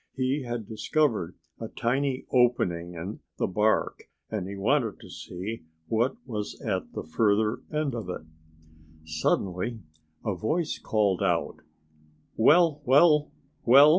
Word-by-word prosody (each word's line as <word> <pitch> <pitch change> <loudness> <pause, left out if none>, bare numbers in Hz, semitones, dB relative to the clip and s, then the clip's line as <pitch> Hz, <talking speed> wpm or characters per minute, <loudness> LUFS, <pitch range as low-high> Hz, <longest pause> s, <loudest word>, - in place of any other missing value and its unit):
He 130 +3 +1
had 120 -4 -4
discovered 110 - 0 0.2
a 115 - -4
tiny 130 +4 -1
opening 90 -9 +2
in 90 +6 -6 0.2
the - - +1
bark 105 +4 +1 0.3
and 105 -4 -2
he 100 - -6
wanted 115 +2 +1
to - - -12
see 95 +1 -6 0.2
what 115 +4 +1
was 105 -5 -5
at - - -2
the - - -4
further 105 +6 +1
end 150 -3 -1
of 110 -6 -5
it. 90 - -4 0.8
Suddenly 90 +7 -1 0.5
a 105 - +1
voice 155 - -1
called 100 -4 +1
out, 90 -4 0 0.8
"Well, 155 +5 +5
well, 150 +3 +5 0.3
well! 140 +5 +8
110 Hz, 130 wpm, -27 LUFS, 95-135 Hz, 0.8 s, well